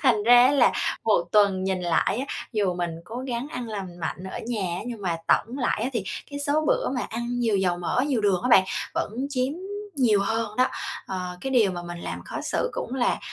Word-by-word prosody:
Thành 235 -6 +4
ra 245 +3 +7
là 265 -4 +5 0.3
một 210 -6 +3
tuần 200 -3 +4
nhìn 190 -1 0
lại 175 +6 +1
á, - - -4 0.2
dù 200 -5 +1
mình 175 -1 -2
cố 230 - -8
gắng 245 +1 -2
ăn 245 -5 -5
lành 190 -5 -6
mạnh 180 +2 -4
ở - - -4
nhà 190 -7 -2
nhưng 230 -4 -6
mà 175 -3 0
tổng 250 +5 +2
lại 245 -3 0
á 245 - 0
thì 230 -6 -2 0.3
cái 285 - -5
số 290 +2 +1
bữa - - +2
mà 255 - -1
ăn 235 +1 -3
nhiều 225 -4 +2
dầu 180 -2 +1
mỡ, 180 +8 0
nhiều 260 -6 +1
đường 195 -4 +2
á 250 - 0
bạn 190 -6 +7 0.3
vẫn - - -1 0.2
chiếm 260 +1 0 0.4
nhiều 225 -6 +4
hơn 220 +1 -1
đó, 255 - +5 0.4
ờ. 180 -1 -4
Cái 270 - -3
điều 230 -7 +4
mà 175 -1 -5
mình 175 0 -7
làm - - -5
khó - - -5
xử 485 - -1
cũng - - -4
là, 250 -2 +1
220 Hz, 225 wpm, -25 LUFS, 185-250 Hz, 0.4 s, ra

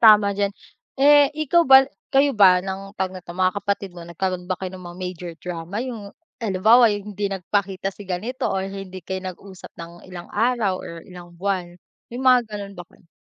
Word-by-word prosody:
tama 200 -1 -1
diyan. 200 0 0 0.5
Eh 290 0 +7 0.2
ikaw 340 +5 +4
ba 270 -3 +8 0.3
kayo 280 +1 +4
ba 185 -3 +7
ng 195 +1 -6
tawag 190 0 -2
neto 180 -2 -9
mga 185 0 +1
kapatid 200 -1 -2
mo 175 - -9
nagkaroon 180 +1 -3
ba 185 - -1
kayo 190 -1 -5
ng 185 - -11
mga 175 - -11
major 180 -1 -5
drama 175 +2 -6
'yung 225 -6 -7 0.3
halimbawa 220 +3 +5
'yung 205 0 -5
hindi 200 0 -1
nagpakita 195 +1 -2
si 205 - -11
ganito 210 +8 -3
or 190 0 -1
hindi 195 -1 -7
kayo 190 +1 -4
nag-usap 185 +1 -9
ng 170 +1 -10
ilang 175 -1 -9
araw 225 -3 +1
or - - -8 0.2
ilang 175 -1 -12
buwan 180 -2 -2 0.3
may 240 +2 -7
mga 255 -1 +7
ganun 205 -2 -7
ba - - -6
kayo? - - -25
195 Hz, 190 wpm, -22 LUFS, 180-210 Hz, 0.5 s, ba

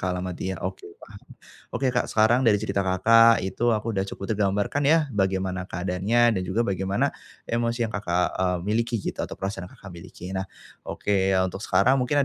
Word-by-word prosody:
alamat 90 0 -3
dia. 95 +1 -4
Oke, 95 -1 -5
paham. 105 -2 -14 0.5
Oke, 135 - -1
Kak 125 - 0
sekarang 115 +4 +3
dari 110 -4 +4
cerita 100 -1 -1
Kakak 115 +4 +5
itu 120 +5 0
aku 110 0 -1
udah 95 - 0
cukup 100 +2 -4
tergambarkan 100 +7 0
ya, 155 +2 +4
bagaimana 95 -2 0
keadaannya 95 +7 +1
dan 95 - -1
juga 105 +6 -1
bagaimana 95 0 -1 0.3
emosi 115 0 0
yang 110 - -10
Kakak, 90 -3 0 0.2
eee, 90 -1 +1
miliki 115 +2 0
gitu - - -4
atau - - -6
perasaan 95 -2 -5
Kakak 100 - -16
miliki. 90 +2 -9
Nah, 95 - -1 0.4
oke 95 -2 0 0.2
untuk 95 +3 -7
sekarang 100 +8 +3
mungkin 145 +4 0
100 Hz, 175 wpm, -25 LUFS, 95-115 Hz, 0.5 s, Kakak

